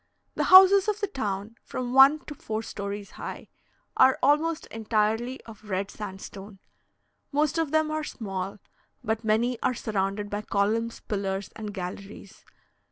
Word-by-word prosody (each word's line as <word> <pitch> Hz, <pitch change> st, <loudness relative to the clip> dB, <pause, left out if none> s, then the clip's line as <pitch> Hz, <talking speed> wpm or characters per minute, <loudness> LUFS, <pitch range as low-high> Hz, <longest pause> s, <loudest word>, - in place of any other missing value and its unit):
The -, -, -1 dB
houses 380 Hz, +1 st, +8 dB
of 425 Hz, 0 st, 0 dB
the 415 Hz, -, 0 dB
town 215 Hz, -, -4 dB
(from 250 Hz, -1 st, -4 dB
one 275 Hz, +3 st, +6 dB
to 295 Hz, -, -7 dB
four 220 Hz, -5 st, -4 dB
stories 200 Hz, -1 st, -6 dB
high) -, -, -8 dB, 0.5 s
are 260 Hz, 0 st, +5 dB
almost 305 Hz, +4 st, +2 dB
entirely 225 Hz, +3 st, 0 dB
of 215 Hz, -2 st, -14 dB
red 195 Hz, +1 st, -2 dB
sandstone; 195 Hz, 0 st, -9 dB, 0.7 s
most 300 Hz, +2 st, +1 dB
of 325 Hz, -3 st, 0 dB
them 315 Hz, +1 st, +1 dB
are 310 Hz, 0 st, -2 dB
small, 195 Hz, -6 st, -5 dB, 0.5 s
but 220 Hz, +1 st, -2 dB
many 225 Hz, +3 st, +1 dB
are 255 Hz, -, +1 dB
surrounded 205 Hz, -2 st, -2 dB
by 205 Hz, 0 st, -3 dB
columns, 215 Hz, +3 st, -1 dB
pillars, 195 Hz, -2 st, -3 dB
and 215 Hz, -1 st, -6 dB
galleries. 200 Hz, +2 st, -8 dB
220 Hz, 145 wpm, -26 LUFS, 200-270 Hz, 0.7 s, houses